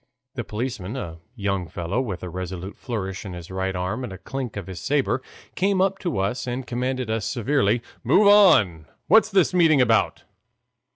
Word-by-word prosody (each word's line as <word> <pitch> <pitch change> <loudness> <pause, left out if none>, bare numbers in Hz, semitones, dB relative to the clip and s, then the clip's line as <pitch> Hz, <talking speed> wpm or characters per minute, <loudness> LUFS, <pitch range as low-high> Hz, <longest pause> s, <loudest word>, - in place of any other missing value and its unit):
The - - -4
policeman, 110 -2 -4
a 85 -11 -6 0.2
young 100 -5 -2
fellow, 85 +8 -2
with 100 -9 -5
a 90 - -4
resolute 95 +1 -6
flourish 100 -6 -4
of 95 -3 -7
his 85 0 -9
right 95 0 -2
arm 90 +8 -2
and 120 - -5
a 95 - -7
clink 125 +1 -5
of 100 - -5
his 95 -2 -7
saber, 135 - 0 0.3
came 195 +1 +1
up 195 +1 +2
to 170 - -2
us 105 +6 -1
and 125 +1 -3
commanded 125 -1 -2
us 110 -2 -1
severely: 120 -1 +1 0.2
"Move 150 - +4
on! 110 - +5 0.2
what's 220 -1 +5
this 190 -4 +3
meeting 165 -5 +5
about?" 115 -3 +2
115 Hz, 180 wpm, -24 LUFS, 95-135 Hz, 0.3 s, on